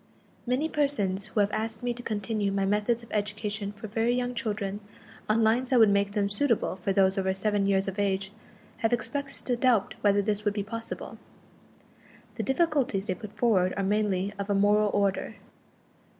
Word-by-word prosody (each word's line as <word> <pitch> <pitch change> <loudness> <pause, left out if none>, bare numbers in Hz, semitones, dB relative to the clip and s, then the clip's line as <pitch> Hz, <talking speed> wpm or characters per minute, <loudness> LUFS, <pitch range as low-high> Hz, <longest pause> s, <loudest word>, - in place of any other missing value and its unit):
Many 255 +6 +1
persons 215 -11 0
who 210 - +1
have 200 +1 +1
asked 220 +1 -3
me 245 0 0
to 240 - -8
continue 210 -2 -2
my 195 0 0
methods 210 +4 +1
of 230 - -15
education 210 0 -2
for 210 +1 -10
very 225 +3 +1
young 250 0 -1
children 210 -4 -3 0.5
on 225 +1 +3
lines 240 +4 +2
that 255 - +3
would 220 -3 +6
make 200 0 +1
them 205 -2 +1
suitable 225 0 +1
for 190 +1 -2
those 195 0 +3
over 190 0 0
seven 205 0 0
years 195 0 +2
of 195 +1 -4
age, 195 -1 0 0.5
have 225 +1 0
expressed 275 +3 -3
a - - +3
doubt 235 -4 +2
whether 205 0 +3
this 210 0 0
would 205 -1 0
be 205 - -1
possible. 230 +2 -7 1.1
The - - -4
difficulties 270 - +1
they 195 - -1
put 215 +1 -10
forward 195 -6 +2
are 200 - 0
mainly 200 -1 0
of 200 +1 -4
a 200 - +2
moral 205 +1 +4
order. 200 +1 0
210 Hz, 185 wpm, -28 LUFS, 200-230 Hz, 1.1 s, would